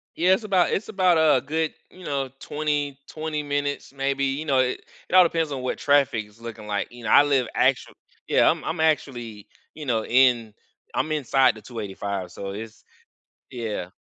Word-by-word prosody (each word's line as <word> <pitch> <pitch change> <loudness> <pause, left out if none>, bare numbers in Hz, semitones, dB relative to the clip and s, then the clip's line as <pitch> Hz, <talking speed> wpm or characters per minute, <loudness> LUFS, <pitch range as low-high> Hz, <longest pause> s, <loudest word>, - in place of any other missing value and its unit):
Yeah, 180 +3 +4
it's 215 - 0
about 190 -4 +2
it's 215 - -2
about 185 -5 +3
a 155 -2 +5
good, 160 +2 -2 0.2
you 185 - -15
know, 140 -3 -2
twenty 145 -2 -2
twenty 155 -1 -4
minutes 145 -1 -3
maybe. 140 0 -1
You 135 +3 -2
know, 135 -3 +2
it 130 0 0 0.3
it - - -8
all 185 - +9
depends 165 -3 0
on 130 - -4
what 130 - -2
traffic 140 -7 +2
is 105 +2 -21
looking 110 -2 -8
like. 105 +1 -2
You 120 -1 -11
know, - - -2
I - - +8
live 135 -5 +1
actual - - +1 0.3
yeah, - - +4
I'm - - 0
I'm 160 0 -2
actually, 120 -9 -1 0.3
you 155 -2 -8
know, 115 -4 0
in 120 -3 +3 0.4
I'm 155 - -1
inside 135 -4 +3
the 110 - -12
285, 100 -4 -5
so, 100 0 -6
it's 110 +2 -9 0.7
Yeah. 110 -7 -4
135 Hz, 190 wpm, -24 LUFS, 115-155 Hz, 0.7 s, all